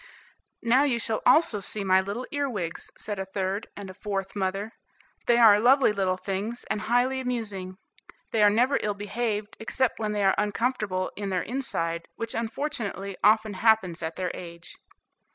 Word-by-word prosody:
"Now 245 +3 +4
you 275 -5 +2
shall 225 -1 -2
also 310 -10 +5
see 200 +1 -3
my 190 -1 +4
little 205 +6 -4
earwigs," 235 - -3
said 210 -2 -4
a 190 - -2
third 195 +2 -3
and 200 -1 -7
a 185 - -9
fourth 195 0 -4
mother, 195 +2 -2 0.6
"they 235 - +5
are 220 -3 +7
lovely 255 0 +5
little 190 -2 0
things, 200 +5 -3
and 215 -1 -1
highly 245 +4 +1
amusing. 210 -7 -3 0.5
They 220 - +1
are 210 - +7
never 245 +6 +3
ill 210 -1 -1
behaved, 210 0 -3
except 250 +3 0
when 215 -1 -1
they 205 -1 0
are 195 -1 +5
uncomfortable 210 -3 -1
in 200 -1 -4
their 185 -1 0
inside, 170 -10 -3
which 230 0 -3
unfortunately 225 -5 -3
often 215 +1 +4
happens 190 -5 +2
at 160 0 -4
their 180 -2 -2
age." 170 -1 -9
210 Hz, 170 wpm, -26 LUFS, 190-235 Hz, 0.6 s, are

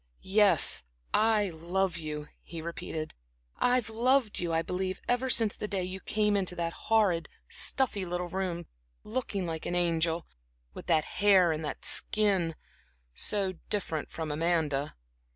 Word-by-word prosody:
"Yes, 205 +1 +5 0.3
I 215 -3 +3
love 175 +2 -1
you," 150 -1 -5
he 165 - -8
repeated. 160 -1 -5 0.5
"I've 245 -2 +2
loved 235 +1 +2
you, 175 -1 -2
I 165 0 +1
believe, 185 +2 -3
ever 245 +2 +1
since 225 -4 +3
the 210 - -4
day 195 -3 -2
you 185 +1 -5
came 210 +2 +1
into 185 -3 +1
that 170 -1 -2 0.2
horrid, 200 -7 +3 0.2
stuffy 240 -7 +1
little 180 0 -3
room, 175 -2 -3 0.4
looking 215 -5 -3
like 160 -2 -4
an 175 - -1
angel 165 -1 +1 0.5
with - - -10
that 155 -1 +3
hair 190 -4 +4
and 155 0 -3
that 150 - -4
skin 195 -7 +2 0.6
so 195 - -1 0.2
different 165 -7 -1
from 160 -2 -4
Amanda." 150 -3 0
180 Hz, 145 wpm, -30 LUFS, 165-210 Hz, 0.6 s, Yes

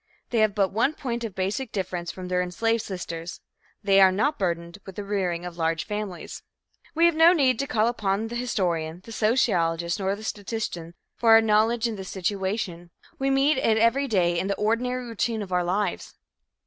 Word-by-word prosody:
They 235 - +1
have 215 -2 +3
but 195 -2 +2
one 240 +9 +1
point 235 -3 -4
of 220 -5 -5
basic 200 +6 -2
difference 180 -3 -3
from 185 -1 -8
their 180 0 +1
enslaved 225 +6 0
sisters 170 -3 -6 0.4
they 195 -1 +5
are 190 -1 +7
not 220 +11 0
burdened 170 0 -2
with 190 - -10
the 205 - -5
rearing 185 -4 -2
of 175 -1 -8
large 165 0 0
families. 210 -3 -5 0.5
We 335 +2 +4
have 340 - +5
no 325 +2 +6
need 260 -8 +2
to 275 - -1
call 220 -2 +2
upon 215 -2 -1
the 240 - -6
historian, 175 -9 -2
the 230 - -11
sociologist 180 -7 +1
nor 195 0 0
the 215 - -11
statistician 200 -6 -5 0.2
for 225 -1 +5
our 225 - +9
knowledge 225 +2 +2
of 225 -2 -4
this 190 -1 -7
situation. 190 -2 -3 0.3
We 270 0 +1
meet 270 +1 +3
it 220 -3 +2
every 230 +5 +3
day 175 -6 +2
in 190 - -2
the 200 - 0
ordinary 245 +4 -1
routine 230 -1 -2
of 190 - -10
our 180 -1 +2
lives. 190 +4 -2
205 Hz, 195 wpm, -25 LUFS, 180-230 Hz, 0.5 s, our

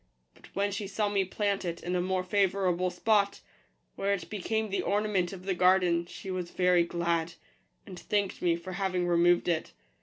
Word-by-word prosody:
But - - -17
when 200 +1 +1
she 200 0 -4
saw 205 +1 -1
me 200 -1 +1
plant 200 +1 -1
it 170 -2 -4
in 180 +1 -2
a 180 - +1
more 185 0 0
favourable 185 -2 +1
spot, 200 +2 +1 0.5
where 200 +1 0
it 180 - -9
became 215 +1 -2
the 200 - 0
ornament 200 -3 0
of 185 -1 -9
the 195 - 0
garden, 180 -2 +3
she 190 - -8
was 180 -2 -3
very 180 -1 +3
glad, 170 -1 -1 0.5
and 185 -3 -9
thanked 205 -2 -1
me 170 -2 +2
for 170 +2 -8
having 185 -1 -1
removed 175 0 +3
it. 170 -2 -1
185 Hz, 185 wpm, -29 LUFS, 175-200 Hz, 0.5 s, garden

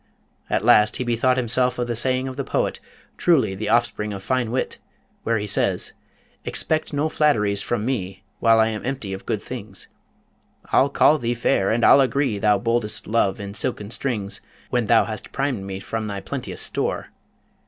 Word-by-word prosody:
At - - 0
last 105 0 +5
he - - -2
bethought 125 +2 +1
himself 125 +1 +1
of 120 - -1
the 120 -1 -3
saying 130 +2 +1
of 130 - -6
the 140 - -3
poet, - - -1 0.4
truly 155 - +3
the 105 +2 -4
offspring 110 -2 +1
of 95 -1 -7
fine 125 +1 0
wit, 125 +3 -2 0.4
where 115 0 0
he 105 - -3
says: 105 - 0 0.5
Expect 155 0 0
no 145 +1 0
flatteries 105 -11 +2
from 115 -3 -2
me, 95 -7 -3 0.2
While 115 -1 +5
I 110 0 +4
am 110 -1 -5
empty 125 -6 -3
of 95 - -8
good 105 - -2
things; 110 -6 -8 0.8
I'll 135 - +4
call 155 +2 +4
thee 120 0 -1
fair, 100 -4 +1
and 115 +1 +1
I'll 140 - +7
agree 135 -5 +1
Thou 105 0 +3
boldest 115 0 -1
Love 105 -3 +1
in 100 -1 -6
silken 105 -1 -3
strings, 110 -7 -2 0.3
When 120 -3 +1
thou 115 - +5
bast 110 -1 -7
primed 135 -8 -2
me 95 -1 -5
from 110 +2 -4
thy 100 -1 -4
plenteous 95 - -4
store! - - -2
115 Hz, 185 wpm, -23 LUFS, 105-130 Hz, 0.8 s, I'll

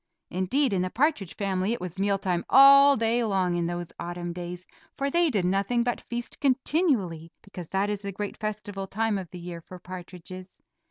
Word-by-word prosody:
Indeed 200 +9 +1
in 185 - +1
the 185 - -1
partridge 250 - 0
family 195 +1 -1
it - - -4
was 180 +1 -7
meal 200 0 +2
time 180 -3 -1
all 275 +1 +8
day 230 +2 +1
long 190 -5 +1
in 170 -1 0
those 175 0 -5
autumn 175 0 -5
days, 175 +1 -7 0.3
for 275 0 -1
they 340 +1 +3
did 205 -9 0
nothing 200 +6 +1
but 245 0 -2
feast 240 0 -6
continually, 255 - +1
because 180 -4 -9
that 195 +1 0
is 205 -1 -3
the 200 -1 -4
great 205 +1 -5
festival 205 -2 -5
time 215 0 0
of 180 -3 -8
the 180 - -9
year 175 -1 -7
for 180 +3 -11
partridges. 185 +1 -10
195 Hz, 195 wpm, -27 LUFS, 180-235 Hz, 0.3 s, all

